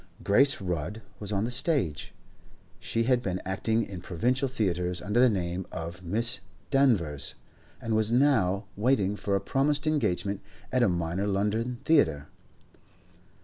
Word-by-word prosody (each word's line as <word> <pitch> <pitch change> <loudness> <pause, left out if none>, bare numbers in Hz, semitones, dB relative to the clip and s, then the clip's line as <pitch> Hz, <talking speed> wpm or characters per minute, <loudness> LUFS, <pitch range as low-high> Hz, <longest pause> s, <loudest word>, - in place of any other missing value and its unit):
Grace 135 +8 +4
Rudd 90 +3 -4 0.2
was 105 -1 -5
on 100 +1 0
the 120 - -3
stage; 125 - 0 0.7
she 115 +6 -1
had 125 0 +2
been 95 -6 -2
acting 110 +4 0
in 95 -4 -7
provincial 125 +10 0
theatres 90 -8 -1
under 105 +4 0
the 125 0 +6
name 90 -3 -2
of 85 +2 -6
Miss 115 +7 +1 0.3
Danvers, 105 - +2 0.4
and 115 -1 -2
was 110 0 +1
now 115 -7 +2
waiting 105 -3 +1
for 100 -1 -1
a - - +2
promised 145 +7 0
engagement 100 - 0 0.3
at 125 - +2
a 120 - +4
minor 85 +3 -1
London 105 +5 -1
theatre. 80 - +2
105 Hz, 145 wpm, -28 LUFS, 90-125 Hz, 0.7 s, the